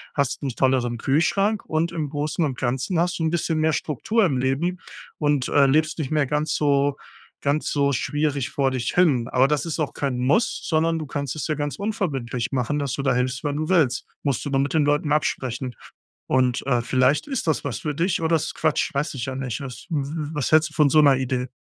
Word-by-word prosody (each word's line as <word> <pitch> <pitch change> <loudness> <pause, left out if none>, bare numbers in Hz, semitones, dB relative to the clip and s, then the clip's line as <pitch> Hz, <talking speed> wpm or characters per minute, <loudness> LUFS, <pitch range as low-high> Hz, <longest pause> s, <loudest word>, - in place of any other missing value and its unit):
hast 140 -3 0
'nen 135 -4 -3
tolleren 130 -3 +1
Kühlschrank 195 - +1
und 160 +2 0
im 155 -3 -3
Großen 150 +3 -2
und 135 -5 -1
Ganzen 130 +8 -1
hast 175 +1 0
du - - -1
'n 160 - +2
bisschen 165 -1 -1
mehr 155 0 +2
Struktur 200 - 0
im 140 -8 0
Leben 145 +8 0 0.4
und, 145 -3 +1
äh, 140 -1 +5
lebst 155 +4 +1
nicht 145 -4 -2
mehr 150 -2 +2
ganz 150 +3 -1
so 140 -1 +2 0.5
ganz 145 +2 0
so 140 -1 +2
schwierig 145 0 -1
vor 135 -1 +1
dich 125 -2 -2
hin. 145 -10 +3
Aber 130 0 +3
das 150 +2 0
ist 165 -1 -3
auch 155 - -1
kein 135 -3 -2
Muss, 140 - +1
sondern 165 0 +1
du 155 - -6
kannst 140 -2 -3
es 150 - -3
ja 155 - 0
ganz 145 0 -3
unverbindlich 145 - -2
machen, 135 +2 -1
dass 140 -4 -2
du 140 - -2
da 135 -2 +1
hilfst, 125 +1 -1
wenn 145 -1 -1
du 155 +1 -2
willst. 150 -10 +2 0.2
Musst 140 -1 -1
du 145 - -3
nur 135 - +2
mit 140 +3 0
den 155 -2 +3
Leuten 145 0 +1
absprechen. 130 -4 -1 0.5
Und, 130 -1 +1
äh, 125 -3 +2
vielleicht 130 - +2
ist 270 -9 -2
das 160 - +1
was 135 -7 -3
für 150 -2 -3
dich 170 +3 0
oder 165 0 +1
es 155 -1 -2
ist - - -6
Quatsch, 155 -2 0
weiß 145 +3 -1
ich 130 -1 -4
ja 130 -1 -4
nicht 130 -4 -4
ist. 130 -2 -8
W 155 -3 0
w 150 +1 -4
was 145 -4 -1
hältst 155 0 +4
du - - -17
von 150 -3 +4
so 155 - +4
'ner 140 -3 +6
Idee? 130 -1 -2
145 Hz, 235 wpm, -23 LUFS, 130-155 Hz, 0.5 s, ner